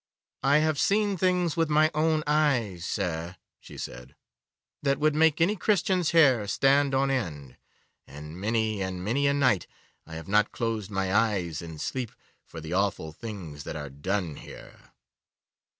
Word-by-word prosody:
'I 140 +3 +4
have 155 -1 +1
seen 205 0 +2
things 180 -3 +1
with 165 -2 +1
my 155 +1 +4
own 155 0 +1
eyes, 125 - +1
sir,' 85 -3 -3 0.2
she - - -13
said, 60 +2 -8 0.7
'that 140 -1 +1
would 155 +1 +2
make 160 0 +3
any 180 +6 +3
Christian's 185 -4 +1
hair 135 -11 +4
stand 135 +4 +3
on 135 +1 +2
end, 75 - -3 0.5
and 75 +5 -10
many 110 -1 0
and 95 -1 -4
many 140 +7 +1
a 140 - +3
night 125 -10 +2 0.4
I 80 - -9
have 80 +2 -8
not 105 +2 +2
closed 115 -4 -3
my 95 -2 -1
eyes 100 -8 +1
in 80 -2 -8
sleep 125 - -4 0.3
for 80 - -10
the 80 +2 -6
awful 95 -4 0
things 85 -7 -8
that - - -6
are 75 -3 -6
done 85 +3 -3
here. - - -13
110 Hz, 160 wpm, -27 LUFS, -, 0.7 s, I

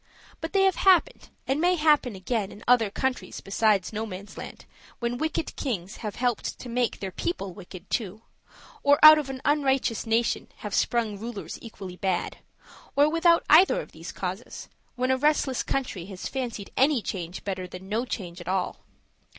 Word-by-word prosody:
But 325 - -5
they 390 -1 +4
have 385 -1 +3
happened, 385 +6 +3 0.2
and 275 +3 +1
may 360 +1 +4
happen 300 - +3
again, 195 +1 -2
in 210 - -12
other 240 -4 +5
countries 260 +5 -3
besides 200 -1 +1
Nomansland, 210 -2 -7 0.3
when 240 0 -2
wicked 315 0 -2
kings 200 -7 -4
have 210 -3 -5
helped 245 -2 -1
to 250 - -9
make 245 0 0
their 190 -1 -4
people 195 - -3
wicked 185 -1 -11
too, 215 -1 -3 0.6
or 285 0 +5
out 310 0 +11
of 285 -3 -5
an 260 -1 -6
unrighteous 270 -6 +1
nation 225 +1 +1 0.2
have 205 - -4
sprung 225 -4 0
rulers 225 -2 -6
equally 190 -5 -9
bad; 185 -2 -1 0.6
or, 285 +1 +5
without 335 +1 +4
either 340 +5 +6
of - - -8
these - - -9
causes, - - -6 0.3
when 255 +1 0
a 260 - +3
restless 290 -2 +2
country 250 -10 -3
has 190 -2 -6
fancied 240 -6 -5
any 270 -3 +3
change 175 -1 -5
better 185 -2 -4
than 180 +1 -10
no 220 +4 0
change 180 -8 -6
at 170 - -11
all. 185 0 -1
235 Hz, 170 wpm, -26 LUFS, 195-275 Hz, 0.6 s, out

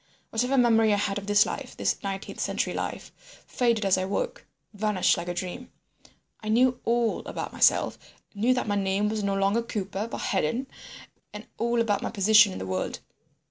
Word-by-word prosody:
Whatever 250 +4 0
memory 225 -3 +4
I - - +4
had 205 0 -1
of 200 - -11
this 205 0 +5
life, - - -6
this - - -1
nineteenth 195 -1 -5
century - - -1
life, - - -5 0.3
faded 235 -4 0
as 190 -1 +3
I 185 - -1
woke, 330 - -3 0.3
vanished 210 -2 +2
like 170 0 -5
a 175 - -2
dream. 185 +8 -6 0.7
I 215 - -6
knew 250 +3 +3
all 235 -1 +1
about - - -5
myself, - - +3 0.3
knew 230 +5 +2
that 250 - -2
my 205 - 0
name 200 +1 0
was 215 0 -2
no 200 0 0
longer 195 +4 +2
Cooper 205 -2 -4
but - - -4
Hedon, 195 - 0 0.7
and 210 +1 -8
all 235 +1 +1
about 210 -3 +1
my - - -2
position 210 0 +5
in - - -6
the 95 - -5
world. 95 0 -3
210 Hz, 185 wpm, -26 LUFS, 195-230 Hz, 0.7 s, this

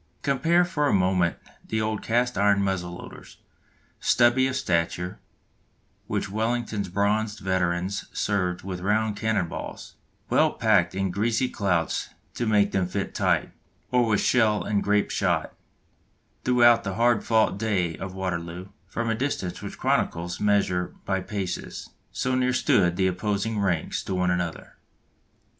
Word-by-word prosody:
Compare 165 +6 +3
for 150 -5 0
a - - +2
moment 90 -2 +2 0.3
the 110 - -1
old 110 -1 -1
cast 120 +2 +1
iron 100 0 +3
muzzle 90 -3 -2
loaders, - - -11 0.6
stubby 125 +2 +4
of 130 - -3
stature, 90 -2 -1 0.9
which - - -2
Wellington's 110 -1 -2
bronzed 105 +3 0
veterans 95 0 -1
served 90 -3 -1
with 95 -1 -5
round 105 +2 +1
cannon 110 -4 0
balls, - - -7 0.3
well - - +3
packed 95 -6 +2
in 95 -1 -1
greasy 110 +6 +1
clouts 90 -8 -1 0.2
to 120 - -2
make 105 -1 +3
them 95 -2 0
fit 100 +2 -3
tight, - - +1 0.4
or 125 -1 +3
with 105 -2 +2
shell 110 -4 +3
and 105 -1 0
grape 105 0 +1
shot, - - 0 0.9
throughout 120 -2 +5
the 100 -2 -3
hard 120 -1 +3
fought 110 -3 +2
day 95 -7 0
of 95 -1 -6
Waterloo, 90 -1 -4 0.2
from 120 0 -3
a 115 - +2
distance 110 -7 -3
which - - -6
the - - -12
chroniclers 90 +2 -1
measure 100 -4 +1
by 95 -1 0
paces, 95 -1 -5 0.2
so 130 - -1
near 125 0 +2
stood 90 -8 +3
the 95 0 +1
opposing 100 +4 -1
ranks 90 -5 0
to 95 - -3
one 90 0 +1
another. 90 -2 -3
100 Hz, 150 wpm, -25 LUFS, 90-115 Hz, 0.9 s, throughout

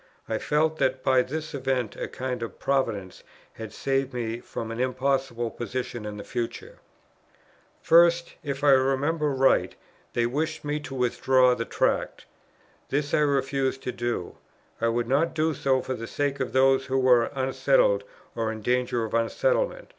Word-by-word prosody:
I - - -1
felt 155 +1 +1
that 130 0 0
by 130 -1 +4
this 155 +5 -5
event 130 -4 -1
a - - -4
kind 125 -2 -4
Providence 105 -9 -1 0.3
had 110 -2 -8
saved 135 -1 -1
me 115 -1 -3
from 115 -1 -6
an 115 - -5
impossible 130 -2 -1
position 120 -2 -5
in 105 0 -6
the 100 - -7
future. 115 +2 -5 1.0
First, 170 0 +5
if 140 -1 -4
I 145 - +6
remember 135 +4 +2
right, 135 -1 +2 0.4
they 120 - +1
wished 155 +6 -2
me 145 +1 -1
to 135 -2 -8
withdraw 125 0 +3
the 115 -1 -3
Tract. - - -1 0.6
This 145 +1 -1
I - - +4
refused 135 -2 0
to 125 - -2
do: 120 -7 -4 0.4
I 115 - +2
would 115 0 0
not 145 +7 +1
do 160 0 +1
so 130 -1 +1
for 130 - -3
the 115 -2 -6
sake 140 -1 -2
of 130 -4 -2
those 135 +1 +3
who 135 0 0
were 125 -3 +5
unsettled - - +2 0.3
or 115 -1 -1
in 110 -1 -7
danger 125 -1 0
of 110 - -8
unsettlement. - - 0
130 Hz, 160 wpm, -26 LUFS, 120-145 Hz, 1.0 s, I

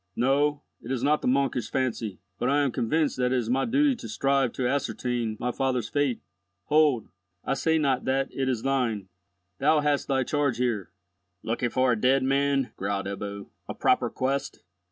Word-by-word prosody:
"No, 145 +4 +1 0.2
it 115 - -10
is 130 -2 -1
not 150 +2 +3
the - - -2
monkish 135 -1 +1
fancy, 115 -6 -2 0.2
but 125 - +1
I 145 +1 +3
am 140 -3 +1
convinced 150 +7 0
that 125 0 +1
it 130 - +2
is 120 -1 -1
my 135 +1 +2
duty 275 +2 +3
to 115 - -8
strive 135 +3 +1
to 125 - -1
ascertain 125 -4 -1
my 125 - -1
father's 125 -4 -1
fate. 145 -4 0 0.5
Hold, 150 -6 +3 0.4
I - - +1
say 160 +4 +1
not 135 -4 +1
that 135 +1 0
it 135 -1 -1
is 120 -4 -1
thine. 120 -8 0 0.5
Thou 155 -1 +4
hast 145 -1 0
thy 135 -1 +1
charge 140 -2 0
here—" 115 -8 -1 0.5
"Looking 120 +2 -1
for 130 +1 +2
a - - +3
dead 130 +1 +3
man," 135 0 +1
growled 100 0 -2
Ebbo; 100 0 -6 0.2
"a - - -4
proper - - +2
quest!" 135 +2 -2
130 Hz, 185 wpm, -26 LUFS, 120-140 Hz, 0.5 s, Thou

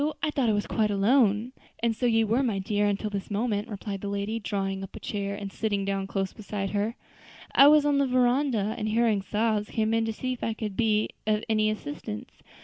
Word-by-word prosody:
I 310 - +1
thought 265 -5 +1
I - - +3
was 205 0 0
quite 215 -1 +1
alone." 210 +2 +3 0.3
"And 230 -1 +2
so 245 - 0
you 225 -1 +3
were, 230 +5 +2
my 230 -7 0
dear, 205 +2 0
until 205 +1 -1
this 200 -1 -4
moment" 210 0 -1
replied 200 -2 -5
the 205 - -4
lady, 200 +3 -2
drawing 195 -2 -2
up 195 - -9
a - - -7
chair, 200 -1 -3
and 200 -1 -6
sitting 205 -3 -1
down 195 -1 -1
close 195 -1 -2
beside 200 -2 -4
her. 210 +3 -1 0.6
"I 275 - +8
was 300 0 +6
on 290 -1 +3
the 280 - +2
veranda, 250 -4 +2
and 215 - -2
hearing 220 -2 +2
sobs, 210 +1 0
came 220 0 0
in 225 0 +2
to 225 - -1
see 255 +3 -3
if 250 - -8
I 225 - -1
could 210 -3 -4
be 215 -1 +2 0.2
of 215 0 +1
any 215 -1 +2
assistance. 145 - -5
215 Hz, 225 wpm, -27 LUFS, 200-230 Hz, 0.6 s, I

